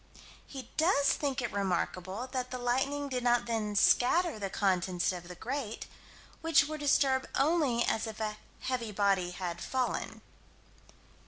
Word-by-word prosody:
He 260 -3 -9
does 315 -3 +4
think 275 -4 -2
it 240 - -2
remarkable 190 +2 -2
that 255 -1 -2
the 255 - -4
lightning 265 +4 0
did 255 -2 -3
not 240 0 +3
then 220 -3 -2
scatter 270 - +3
the 200 -1 -3
contents 185 -3 +1
of 175 -1 -7
the 180 - -8
grate, 240 +2 -4 0.6
which 325 -3 +4
were 310 0 -5
disturbed 275 -2 +2
only 275 -6 +2
as 225 - 0
if 220 -1 -7
a 215 -1 -2 0.2
heavy 245 -4 -2
body 195 -3 +2
had 175 -1 -5
fallen. 255 -2 -2
240 Hz, 150 wpm, -31 LUFS, 200-275 Hz, 0.6 s, does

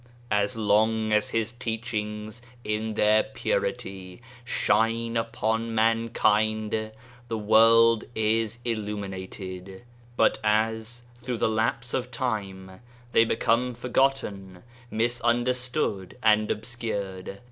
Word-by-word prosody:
As 105 +2 +1
long 110 +1 +2
as 105 0 +2
His 115 0 -1
teachings 110 -2 -4 0.2
in 110 +1 -2
their 105 +1 +4
purity 130 - -3 0.2
shine 115 0 +1
upon 115 0 -1
mankind, 110 -1 +1 0.4
the 115 -1 -2
world 115 +1 +5
is 110 +1 +1
illum 105 -3 -2
inated; 95 0 -8 0.4
but - - +3
as 110 +2 0 0.2
through 125 -1 -3
the - - +2
lapse 115 +2 -1
of 125 -1 -1
time 100 -6 -4 0.3
they 115 - +5
become 120 +2 +1
forgotten, 120 -7 -1 0.3
misunderstood, 120 -2 0
and 110 -1 +4
obscured. 100 -5 -4
110 Hz, 100 wpm, -26 LUFS, 105-115 Hz, 0.4 s, world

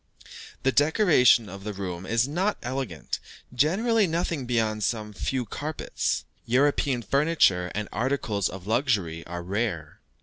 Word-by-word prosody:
The 135 - +3
decoration 145 - +4
of 100 +1 -9
the 105 0 -4
rooms 95 -2 -5
is 115 +3 +2
not 185 +8 0
elegant, 125 - -4 0.3
generally 200 - +2
nothing 165 -5 -2
beyond 110 -3 0
some 105 0 -2
few 125 +5 -2
carpets; 150 +8 -3 0.2
European 135 0 +2
furniture 135 - +2
and 105 0 -2
articles 115 -5 0
of 95 -1 -9
luxury 105 - 0
are 85 0 -5
rare. 95 -5 -3
120 Hz, 130 wpm, -26 LUFS, 100-145 Hz, 0.3 s, decoration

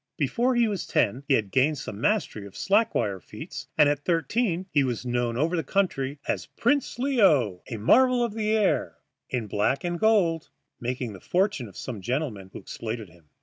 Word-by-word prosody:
Before 250 +1 +1
he 240 -1 +4
was 200 -4 -3
ten 125 +7 +1
he 135 - +4
had 105 -5 -1
gained 145 +3 +2
some 110 -5 -7
mastery 190 - 0
of 100 - -13
slack 215 +3 +2
wire 100 -2 0
feats, - - -9
and 150 - +6
at 145 0 0
thirteen 180 +2 0
he 145 -2 +3
was 125 -2 -2
known 120 -1 -1
over 160 +6 +1
the 165 - 0
country 145 -5 -1
as - - -2
Prince 280 +2 0
Leo, 185 - +3
a 115 - -4
marvel 250 - +4
of 235 -3 -2
the 215 -1 -1
air, 185 - +1 0.3
in 125 -3 -2
black 105 +6 0
and 175 -1 -2
gold, 185 -8 +2 0.3
making 125 -2 -3
the 95 - -10
fortune 185 - 0
of 95 - -14
some 115 -6 -6
gentlemen 120 -5 -3
who - - -8
exploited 110 -3 -6
him. 85 -1 -21
145 Hz, 190 wpm, -26 LUFS, -, 0.3 s, and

